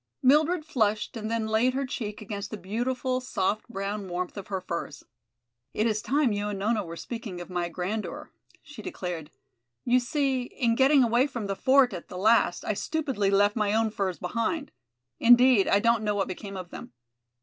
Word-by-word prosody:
Mildred 310 +5 +4
flushed 215 -8 0
and 215 -1 -4
then 230 -1 -1
laid 225 +4 +2
her 275 +1 0
cheek 215 -4 -5
against 200 -1 -5
the 215 - -6
beautiful, 250 +6 -2
soft 215 -4 -1
brown 200 -2 -4
warmth 180 0 -3
of 200 - -7
her 195 -2 -2
furs. 170 -5 -5 0.7
"It 215 - +1
is 215 -2 +1
time 280 -1 +1
you 205 0 -2
and 205 - -3
Nona 210 +2 0
were 165 -2 -8
speaking 215 -2 -6
of 175 +1 -9
my 175 -1 -1
grandeur," 185 +5 -4 0.3
she 290 -7 -11
declared. 175 -6 -5 0.6
"You 250 +1 +4
see, 265 0 0
in 245 -1 -1
getting 270 +3 +5
away 240 +3 +3
from 240 -6 -5
the 195 0 -2
fort 260 0 +4
at 175 - -7
the 180 - -8
last 210 -3 +3
I - - 0
stupidly 265 -5 -1
left 205 +1 +3
my 210 -2 +1
own 225 -1 +2
furs 190 -4 -2
behind; 230 - -2 0.5
indeed, 245 -2 +6
I - - +4
don't 230 +1 +2
know 210 -1 0
what 195 - 0
became 195 +1 -6
of 180 -2 -8
them. - - -9
215 Hz, 190 wpm, -27 LUFS, 195-250 Hz, 0.7 s, indeed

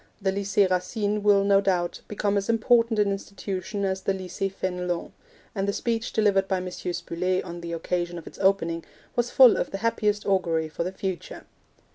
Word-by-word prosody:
The 190 -2 0
Lycee 200 +1 +2
Racine 205 +3 -1
will, 200 -1 +4
no 200 0 +4
doubt, 180 -3 0
become 205 -1 -1
as 200 +2 -1
important 230 0 +3
an 205 -1 +3
institution 195 0 -4
as 190 0 -1
the 195 0 0
Lycee 190 +1 -3
Fenelon, 180 -2 -3 0.4
and 195 -1 -1
the 200 - +1
speech 230 +1 -2
delivered 200 -3 +2
by 190 - +1
M. 180 - -4
Spuller 180 +1 -2
on 175 0 -7
the 170 0 -5
occasion 175 +1 -2
of 170 - -9
its - - -11
opening 170 -4 +1 0.3
was 240 0 +1
full 255 -3 +7
of - - -1
the 195 - -4
happiest 210 -2 +1
augury 165 -5 +1
for 165 - -3
the 180 - -3
future. 190 -2 -5
195 Hz, 185 wpm, -26 LUFS, 180-205 Hz, 0.4 s, full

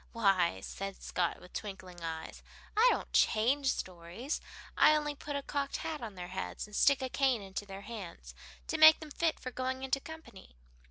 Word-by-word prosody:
"Why," 195 - +2
said 195 - -6
Scott, 175 -2 -1
with 180 - -15
twinkling 185 -4 -7
eyes, 160 -1 -5 0.3
"I 445 +4 +6
don't - - -3
change 265 +6 +3
stories. 180 - -4 0.3
I 305 - +7
only 295 -1 0
put 290 0 -6
a 280 - -2
cocked 280 -1 -2
hat 310 -3 -4
on 220 -4 -6
their 180 -1 -7
heads, 190 +1 -4
and 210 0 -11
stick 280 +3 +4
a 260 - -2
cane 260 -5 +2
into 195 +1 -6
their 195 0 -7
hands 200 -5 -8 0.3
to 320 - -2
make 315 0 +10
them 310 -2 -9
fit 330 +2 0
for 255 - -6
going 260 +1 -3
into 265 +1 +1
company." 320 - -12
230 Hz, 185 wpm, -32 LUFS, 190-280 Hz, 0.3 s, make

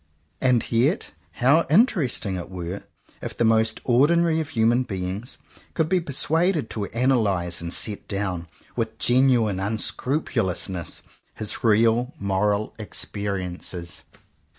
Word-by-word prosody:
And 125 -3 +2
yet 125 - +1 0.2
how 140 +7 +3
interesting 155 - +2
it 90 - -6
were, 90 +1 -6 0.4
if - - -6
the 120 - +2
most 110 0 +3
ordinary 160 +6 +3
of 155 -2 -3
human 115 +2 +2
beings 95 +2 -4 0.4
could 160 - +1
be 185 0 +3
persuaded 160 +2 0
to 105 -2 -2
analyze 105 -9 0
and 85 0 -5
set 105 +2 -1
down, 95 -4 -3 0.3
with 110 -2 -2
genuine 120 -6 +3
unscrupulousness, 105 - -1 0.3
his 110 - -4
real 115 +3 +3
moral 100 +2 0
experiences! 95 -5 -4
110 Hz, 115 wpm, -24 LUFS, 100-130 Hz, 0.4 s, how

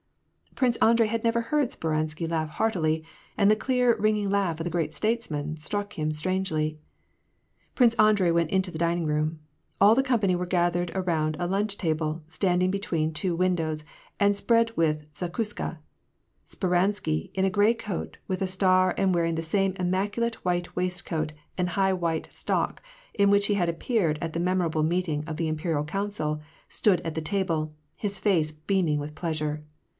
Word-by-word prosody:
Prince 245 -3 +2
Andrei 230 0 +4
dd 230 0 -2
never 230 0 +2
heard 285 +2 0
Speransky 155 +1 -2
laugh 160 -1 -1
heartily, 160 -5 0 0.3
and 200 - +4
the 215 - +6
clear, 250 +1 +2
ring 215 0 +2
ing 205 -1 -1
laugh 190 -5 +1
of - - -2
the 175 - -2
great 165 -3 -1
statesman 155 -10 -2
struck 205 +6 -3
him 155 -1 -1
strangely. 155 -2 -1 0.9
Prince 240 -3 +4
Andrei 210 -6 +4
went 170 -1 +1
into 190 -1 +1
the 160 -3 -7
dining 170 0 +1
room. 155 +1 0 0.4
All 205 +3 +7
the 270 - +3
company 220 -8 +2
were 180 0 -2
gathered 175 -1 +1
around 160 -5 0
a 175 - -1
lunch 200 +2 -1
table, 160 -2 -1
standing 180 +2 +1
between 165 -5 -1
two 175 +2 0
win 185 +1 +2
dows, 155 -2 -1 0.3
and 205 0 +4
spread 230 +2 +2
with 155 -2 +1
the 180 - -3
zakuska, 210 -4 -4 0.7
Speransky, 180 - 0
in 190 0 +1
a - - +3
gray 205 +4 +4
coat, 215 -5 -5
with 185 0 -2
a 190 - +1
star, 185 0 +3
and 190 -2 +2
wearing 165 -1 +1
the 165 - -1
same 195 +4 +1
immaculate 205 +6 -1
white 175 -1 -1
waist 180 0 -2
coat 155 -2 -2 0.3
and 180 -1 0
high 190 +2 +2
white 170 -3 -2
stock, - - -1 0.3
in 200 -2 +3
which 200 0 +4
he 210 - +2
had 180 -4 +1
appeared 170 -2 0
at 165 -1 -3
the 165 - -2
memorable 175 -3 +1
meeting 160 -2 0
of 155 -1 -5
the 165 -1 -1
Imperial 155 -1 -1
Council, 155 -3 -2 0.3
stood 185 -5 +2
at 165 -2 -4
the 160 - -1
table, 160 -3 -1 0.2
his 200 -2 -4
face 165 -7 +2
beaming 155 0 0
with 150 +1 -6
pleasure. 155 -2 -2
180 Hz, 180 wpm, -27 LUFS, 160-200 Hz, 0.9 s, All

